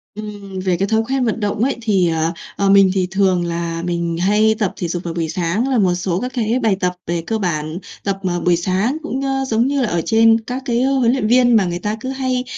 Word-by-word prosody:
Ừm 205 -3 -7
về 185 -2 0
cái 195 +2 0
thói 220 +1 +2
quen 265 -1 +1
vận 230 0 -1
động 210 +1 -1
ấy 270 +2 +1
thì, 195 -6 +2
ờ, 160 +1 0 0.2
ờ, 200 -1 +1
mình 195 -1 +6
thì 185 -2 0
thường 185 -2 +2
là 170 0 -3
mình 170 -1 -2
hay 210 +3 +3
tập 200 -4 0
thể 175 - -2
dục 175 +1 -4
vào 170 - -4
buổi 165 -2 -2
sáng 180 +8 -1
là 260 - +1
một 190 -5 +3
số 180 0 -1
các 250 +4 -4
cái 235 +1 0
bài 215 -3 +3
tập 180 -1 0
về 170 0 -1
cơ 225 - 0
bản 155 -4 -2 0.3
tập, 195 -1 -1
ờ, 175 -1 -1
buổi 175 0 +2
sáng 190 - 0
cũng, 265 -3 -3
ơ, 270 0 -1
giống 230 +1 +1
như 280 -1 0
là 240 - +1
ở 170 -1 0
trên 225 0 +4
các 250 +4 -5
cái, 240 -2 0
ơ, 270 - +2
huấn 240 -3 +3
luyện 250 -5 0
viên 245 0 +4
mà 205 -4 +4
người 175 0 -3
ta 210 +3 -2
cứ 260 +4 -5
hay 260 -1 -1
200 Hz, 265 wpm, -19 LUFS, 175-235 Hz, 0.3 s, mình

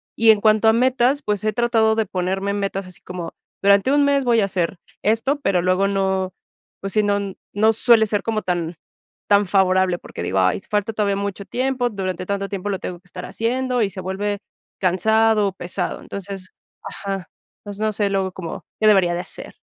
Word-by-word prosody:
y 225 0 +6
en 210 - +2
cuanto 215 0 +4
a 220 - +6
metas, 255 +3 +2
pues, 210 -6 -2
he 215 -1 0
tratado 225 -2 +2
de 220 -1 0
ponerme 190 +2 -1
metas 195 -1 -3
así 180 - -7
como, 175 -2 -7 0.3
durante 200 +5 +5
un 290 0 +4
mes 280 -1 +2
voy 235 -2 +4
a - - +3
hacer 185 -2 -1 0.3
esto, 230 +7 +1
pero 195 -9 +1
luego 185 +2 +2
no, 190 -2 0 0.5
pues 195 - -4
sí, 215 - +3
no 200 -1 0 0.2
no 215 +2 +4
suele 225 0 +5
ser 205 -1 0
como 220 -1 -1
tan 175 -2 -2 0.5
tan 205 0 +5
favorable, 185 -1 +3
porque - - -9
digo: 95 +2 0
"Ay, 95 - +2
falta 210 +1 -2
todavía 205 -2 0
mucho 200 0 -4
tiempo, 255 +1 -1
durante 185 -4 -4
tanto 200 0 -2
tiempo 195 0 -4
lo 195 -2 -2
tengo 180 - -5
que 185 - -39
estar 180 0 -8
haciendo", 250 +1 -1
y 205 - +2
se 190 0 -6
vuelve 200 +2 -2 0.4
cansado 215 +3 +3
o 195 - -3
pesado. 175 -1 -3
Entonces, 195 -1 -7 0.3
ajá, 195 -2 -5 0.3
pues, 205 -1 -8
no 215 0 0
sé, 205 -1 +1
luego 190 -1 -1
como, 170 -3 -7 0.2
¿qué 215 - +5
debería 190 -4 +5
de 175 - -2
hacer? 185 - -10
200 Hz, 200 wpm, -21 LUFS, 185-220 Hz, 0.5 s, y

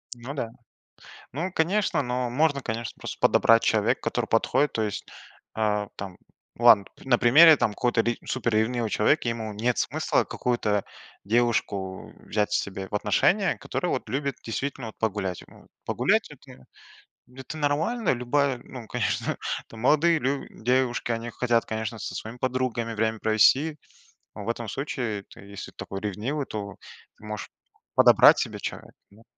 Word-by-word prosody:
Ну 120 +3 -7
да. 120 -6 -4 0.8
Ну, 170 +8 -3
конечно, 180 -2 +1
ну, 125 -1 -2
можно, 145 +1 +1
конечно, 115 0 -4
просто - - -7
подобрать 115 0 +5
человека, - - +2
который - - -2
подходит. 145 - +2
То 110 - -1
есть, 105 -2 -3 0.5
э, 105 -1 0
там 95 -2 -7 0.4
Ладно, 115 -4 +7
пт - - -16
на 130 -3 +3
примере 155 +7 +8
там 105 - +1
какого-то 120 0 +1
ре 120 0 0
супер 120 -3 -1
ревнивого 115 +1 +1
человека: 110 - +2
ему 115 -2 -3
нет 115 +3 0
смысла - - 0
какую-то 110 -5 -1 0.4
девушку 100 -4 -1
взять 105 0 0
себе 95 -2 -2
в - - -10
отношения, 175 - +2
которая 180 - -3
вот 125 - -3
любит 140 +3 -2
действительно 130 +1 -4
вот 110 - -9
погулять, 100 -5 -2
м. - - -18 0.2
Погулять- - - +1
это 65 - -15 0.7
это 135 +4 -8
нормально. 165 - +1
Любая, 130 +2 +1
ну, 120 -4 -10
конечно, - - -1 0.3
там 115 - -11
молодые 160 +6 +4
лю 140 -1 -2
девушки, 125 0 0
они 115 +1 -3
хотят, 120 -1 +1
конечно, 110 0 -4
со 90 - -5
своими 110 +5 -7
подругами 125 -3 -1
время 110 0 0
провести, 130 +9 +3 0.6
но 105 - -8
в - - -3
этом 115 -1 -3
случае 120 -4 -3
ты, - - -14
если 100 0 -9
такой 95 - -7
ревнивый, 110 +9 -3
то 100 -4 -6 0.4
можешь 105 -1 -7 0.5
подобрать - - +7
себе - - -3
человека. - - -6 0.2
Ну, 105 +3 -20
120 Hz, 155 wpm, -26 LUFS, 105-135 Hz, 0.8 s, примере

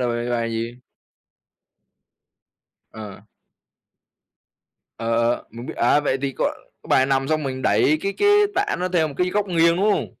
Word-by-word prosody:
là 125 - 0
bài 120 +1 -2
bài 115 -1 -1
gì? 115 +1 -4 2.2
Ờ. 105 -3 -10 1.7
Ờ, 115 0 -1
ờ, - - -2
mình 115 +2 -9
biết. - - -7
À, 120 +5 +3
vậy 135 -2 -1
thì 140 -1 -1
có - - -2 0.4
cái - - -16
bài 130 - +4
nằm 135 0 0
xong 155 -1 0
mình 130 -2 -4
đẩy 120 +9 +3
cái 200 +3 -2
cái 410 - +1 0.3
tạ 405 +2 0
nó 180 - -1
theo 165 -4 +1
một 140 - -9
cái 180 0 0
góc 205 +1 0
nghiêng, 170 -2 +3
đúng 205 +3 +2
không? - - -1
135 Hz, 175 wpm, -22 LUFS, 120-175 Hz, 2.2 s, bài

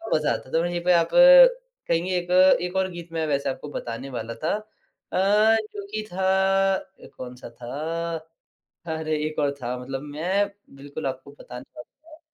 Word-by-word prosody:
मज़ा 150 -1 +1
आता 130 - -7
था। 165 - +3
वहीं 175 0 -2
पे 180 0 +4
आप 170 -1 +3
कहेंगे - - +5
एक 175 0 -4 0.3
एक 180 +1 -4
और 190 0 +1
गीत 175 -1 -9
मैं 160 -1 -1
वैसे 140 -1 0
आपको 145 +2 -6
बताने 120 +3 -6
वाला 115 +1 -5
था 160 - +1 0.6
अ, - - 0 0.6
जो 200 -1 -6
कि 215 0 -3
था 190 +1 -2 0.5
अ, - - -10
कौन-सा 125 -1 -9
था? 160 +8 -4 0.7
अरे, 160 -1 -2
एक 155 0 -4
और 145 -1 +2
था 125 +1 -3
मतलब 135 +1 -5
मैं 170 +8 -1 0.3
बिल्कुल 140 +2 -8
आपको 130 +1 -6
बताने 125 0 -9
वाला 310 - -14
था। - - -35
160 Hz, 170 wpm, -24 LUFS, 135-185 Hz, 0.7 s, कहेंगे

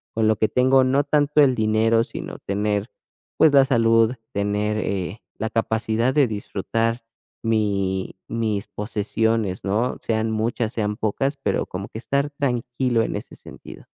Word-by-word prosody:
con 110 -1 +2
lo 110 - +3
que 110 - +2
tengo, 130 +1 +4
no 135 +2 +2
tanto 150 +1 +3
el 135 -3 +5
dinero, 110 +1 +2
sino - - -7
tener, 105 +1 -1 0.5
pues 155 - +5
la 140 -1 +7
salud, 115 -2 +3 0.2
tener, 105 +1 0
eh, 100 -1 -3 0.2
la 110 - -2
capacidad 115 +2 0
de 145 -2 +5
disfrutar 115 +2 -2 0.4
mi 100 -4 0
mis 110 -3 -2
posesiones, 105 0 -1
¿no?, 110 +6 0
sean 110 0 -1
muchas, 110 +1 -1
sean 105 -2 -2
pocas, 135 +7 -1
pero - - 0
como 95 +2 -6
que 110 - -7
estar 140 +4 -1
tranquilo 125 -3 0
en - - -3
ese - - -9
sentido. - - -12
110 Hz, 150 wpm, -23 LUFS, 105-125 Hz, 0.5 s, la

